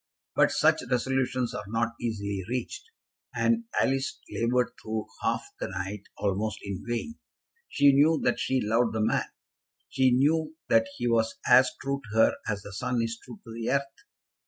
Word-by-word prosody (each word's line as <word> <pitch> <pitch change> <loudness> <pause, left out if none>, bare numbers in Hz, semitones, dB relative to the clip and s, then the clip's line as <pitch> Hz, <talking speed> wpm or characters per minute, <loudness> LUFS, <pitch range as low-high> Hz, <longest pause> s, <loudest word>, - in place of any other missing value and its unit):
But - - +5
such - - +3
resolutions 125 -1 0
are - - -5
not 115 +2 0
easily 100 -4 -2
reached, 405 - -4 0.5
and 235 0 +2
Alice 135 0 0
laboured 120 +1 +1
through 110 0 -3 0.2
half - - 0
the - - -2
night 95 +1 -5
almost 105 +2 -1
in 100 -2 -5
vain. 120 - -3 0.5
She 140 -1 +5
knew 150 +3 +4
that - - +1
she 130 -1 +1
loved 115 +2 +2
the 110 - 0
man. 110 - +1 0.6
She 130 -1 +3
knew 155 +5 +2
that 115 0 +4
he 120 - -1
was 115 -1 +2
as 130 0 +7
true 140 0 -2
to 110 - -3
her 110 - +5
as 100 -2 -2
the 100 - -9
sun 125 +4 -1
is 115 0 -3
true 120 -4 -11
to 115 - -10
the 115 0 -3
earth. 140 +1 0
120 Hz, 170 wpm, -28 LUFS, 110-135 Hz, 0.6 s, as